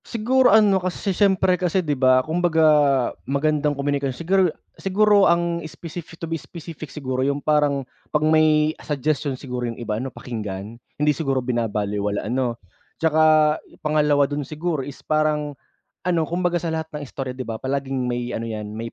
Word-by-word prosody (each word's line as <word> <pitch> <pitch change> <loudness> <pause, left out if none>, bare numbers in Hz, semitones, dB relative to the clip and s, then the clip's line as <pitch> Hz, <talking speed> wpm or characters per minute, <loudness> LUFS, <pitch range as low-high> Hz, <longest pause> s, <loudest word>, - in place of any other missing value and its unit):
Siguro 250 +3 +2
ano 205 -2 +5
kasi 185 +2 -2
siyempre 190 -1 +2
kasi 180 0 +1
'di 150 - +1
ba, 130 -1 +3
kumbaga 160 0 +2 0.6
magandang 150 +1 +1
komunikasyon 140 -2 -1
siguro 190 +3 +2 0.3
siguro 205 +1 +3
ang 170 0 +1
specific, 165 0 -9
to 165 - -5
be 165 -1 -4
specific 160 -3 -9
siguro 130 -3 -3
yung 140 +1 +1
parang 145 -2 +1 0.2
pag 150 0 +1
may 155 0 +4
suggestion 145 -1 -1
siguro 125 -2 -4
yung 115 - -7
iba 110 -2 -3
ano 135 - -4
pakinggan, 110 -2 -7 0.2
hindi 150 +1 +3
siguro 135 -3 -1
binabalewala, 105 -4 -1
ano? 120 +1 -1 0.4
Tsaka 155 -1 +4 0.3
pangalawa 150 -2 +3
dun 145 +1 -3
siguro 155 +2 -3
is 135 +1 -8
parang 150 -1 0 0.5
ano, 170 -3 +1
kumbaga 175 0 0
sa 170 - -3
lahat 160 0 -3
ng 150 -1 -5
istorya 130 -1 -5
'di 130 -1 -7
ba 115 - -3
palaging 135 +1 -2
may 120 0 -2
ano 115 - -4
yan 110 -2 -5
may 115 +1 -5
150 Hz, 160 wpm, -22 LUFS, 130-165 Hz, 0.6 s, ano